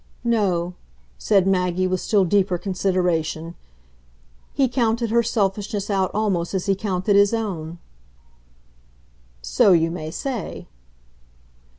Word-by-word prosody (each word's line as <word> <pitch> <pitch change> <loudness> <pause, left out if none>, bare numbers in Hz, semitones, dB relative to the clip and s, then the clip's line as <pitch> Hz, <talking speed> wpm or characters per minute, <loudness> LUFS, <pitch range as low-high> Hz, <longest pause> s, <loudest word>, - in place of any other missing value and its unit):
"No," 190 -7 0 0.5
said 195 -3 +3
Maggie 185 -1 +1
with 185 -1 -1
still 200 -3 +2
deeper 185 0 +2
consideration: 175 -4 -1 1.0
"he 270 - +2
counted 235 -2 0
her 235 +1 +4
selfishness 205 -1 -1
out 190 -2 +1
almost 195 -4 -1
as 190 - -2
he 200 - +2
counted 195 0 -1
his 200 +2 +4
own." 175 -7 -4 1.7
"So 180 - +4
you 165 -1 +2
may 155 -2 -5
say." 240 - -5
195 Hz, 110 wpm, -22 LUFS, 180-210 Hz, 1.7 s, her